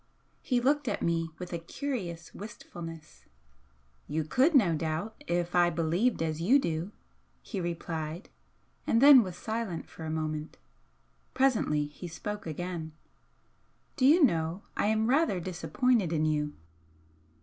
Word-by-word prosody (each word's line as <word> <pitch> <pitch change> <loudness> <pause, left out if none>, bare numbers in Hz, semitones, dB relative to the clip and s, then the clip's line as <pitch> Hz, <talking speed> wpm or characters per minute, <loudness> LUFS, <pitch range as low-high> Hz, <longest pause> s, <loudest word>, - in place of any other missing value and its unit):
He 250 -2 +1
looked 285 +3 +1
at - - -1
me 165 -1 0
with 180 0 -7
a 170 - -2
curious 170 - -5
wistfulness. 165 -6 -9 0.8
"You 155 +1 -1
could, 260 - +3
no 200 -11 +5
doubt, 160 +7 -3
if 175 0 -1
I 175 -1 +5
believed 170 +6 +1
as 160 0 -2
you 230 +11 +5
do," 170 - -2 0.5
he 200 -5 -4
replied, 165 0 -4 0.6
and 230 - +3
then 275 -1 +9
was 185 -5 -5
silent 220 -6 -4
for 160 - -11
a 160 - -4
moment. 155 -1 -3 0.8
Presently 230 - +2
he 150 +5 -9
spoke 210 +4 -6
again. 160 0 -5 1.0
"Do 260 -3 +3
you 320 +4 +6
know 165 - +1
I - - +1
am 220 +1 +2
rather 270 - +2
disappointed 190 - 0
in 155 -2 +1
you?" 150 -1 0
175 Hz, 140 wpm, -29 LUFS, 160-230 Hz, 1.0 s, then